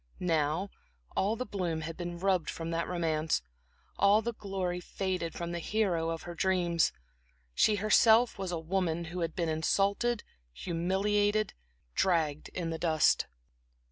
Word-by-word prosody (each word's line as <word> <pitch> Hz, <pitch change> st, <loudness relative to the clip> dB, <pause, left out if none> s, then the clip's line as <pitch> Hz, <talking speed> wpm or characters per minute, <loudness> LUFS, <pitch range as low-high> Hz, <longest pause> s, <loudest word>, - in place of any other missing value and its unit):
Now 165 Hz, +2 st, 0 dB, 0.4 s
all 205 Hz, +3 st, +1 dB
the 255 Hz, -, -3 dB
bloom 175 Hz, -7 st, -2 dB
had 165 Hz, +1 st, -5 dB
been 175 Hz, -1 st, -5 dB
rubbed 185 Hz, -3 st, +1 dB
from 165 Hz, 0 st, -4 dB
that 165 Hz, 0 st, -1 dB
romance, 160 Hz, -, 0 dB, 0.6 s
all 205 Hz, +2 st, +5 dB
the 235 Hz, +1 st, -2 dB
glory 190 Hz, -4 st, -3 dB
faded 180 Hz, -2 st, -3 dB
from 170 Hz, 0 st, -4 dB
the 170 Hz, -, -3 dB
hero 175 Hz, -4 st, 0 dB
of 165 Hz, 0 st, -4 dB
her 175 Hz, -, -6 dB
dreams; 175 Hz, -2 st, +2 dB, 0.6 s
she 210 Hz, -, +4 dB
herself 220 Hz, +2 st, +4 dB
was 190 Hz, -2 st, -3 dB
a 170 Hz, -, -1 dB
woman 170 Hz, 0 st, -1 dB
who 180 Hz, -, -3 dB
had 165 Hz, -1 st, -2 dB
been 170 Hz, -2 st, 0 dB
insulted, 200 Hz, +8 st, +1 dB, 0.3 s
humiliated, 205 Hz, -, 0 dB, 0.4 s
dragged 160 Hz, -, +1 dB
in 170 Hz, -2 st, -3 dB
the 160 Hz, -, -4 dB
dust. 160 Hz, -3 st, +3 dB
175 Hz, 145 wpm, -31 LUFS, 165-200 Hz, 0.6 s, all